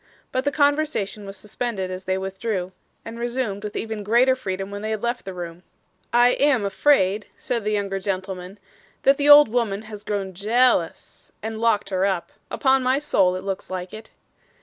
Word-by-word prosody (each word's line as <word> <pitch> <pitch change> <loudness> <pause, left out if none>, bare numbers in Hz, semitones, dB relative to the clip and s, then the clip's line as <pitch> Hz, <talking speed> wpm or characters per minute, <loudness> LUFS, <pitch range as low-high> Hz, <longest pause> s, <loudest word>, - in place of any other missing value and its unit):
But 260 +1 -1
the 285 - +2
conversation 285 -9 0
was 195 0 -8
suspended 210 -3 -4
as 185 +1 -7
they 190 0 0
withdrew, 190 0 -3 0.3
and 230 +1 -8
resumed 235 -4 -2
with 210 - -6
even 220 -1 -4
greater 240 +5 +4
freedom 195 -5 -4
when 205 0 -6
they 215 - -3
had 220 0 -3
left 240 +1 -2
the 190 - -6
room. 175 -1 -7 0.5
'I 240 +1 +5
am 260 -5 +2
afraid,' 200 -1 +2
said 235 -3 -3
the 215 +1 -1
younger 200 -2 -1
gentleman, 190 0 -4 0.5
'that 275 0 +5
the 290 0 +2
old 295 0 +10
woman 220 -3 -1
has 210 -1 -10
grown 200 -3 -3
jea 230 +7 +3
a - - +3
lous, 165 -1 -7
and 220 0 -4
locked 215 -3 +1
her 185 0 +1
up. 190 -3 -1 0.2
Upon 265 -1 +2
my 255 +1 +2
soul 195 -11 +2
it 185 - -5
looks 195 -1 -4
like 185 -1 -5
it. 220 +1 -10
210 Hz, 195 wpm, -23 LUFS, 190-245 Hz, 0.5 s, old